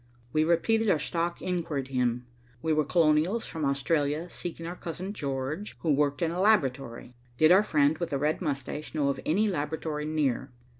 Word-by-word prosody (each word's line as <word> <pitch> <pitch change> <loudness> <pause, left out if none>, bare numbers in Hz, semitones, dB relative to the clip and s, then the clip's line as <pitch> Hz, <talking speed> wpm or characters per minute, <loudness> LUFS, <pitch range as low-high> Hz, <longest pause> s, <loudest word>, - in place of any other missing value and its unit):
We 155 0 +3
repeated 215 +7 +2
our 175 - +4
stock 170 +3 -2
inquiry 165 -6 -2
to 135 +1 -13
him. 125 -1 0 0.4
We 160 - +2
were 155 0 +3
Colonials 165 +7 +2
from 160 -2 -5
Australia 145 +3 0
seeking 165 -1 -6
our 175 +2 -5
Cousin 180 +3 -6
George, 140 +4 -4
who 160 -3 +2
worked 145 +2 +1
in 165 - +1
a 180 +2 -2
laboratory. 135 - +1 0.2
Did 155 +4 +5
our 190 +2 +7
friend 150 -6 +2
with 170 - -2
the 140 - -1
red 150 +5 0
moustache 150 0 -4
know 145 -2 +2
of 140 - -2
any 200 +8 +3
laboratory 150 -3 -2
near? 145 -4 0
155 Hz, 185 wpm, -28 LUFS, 140-170 Hz, 0.4 s, our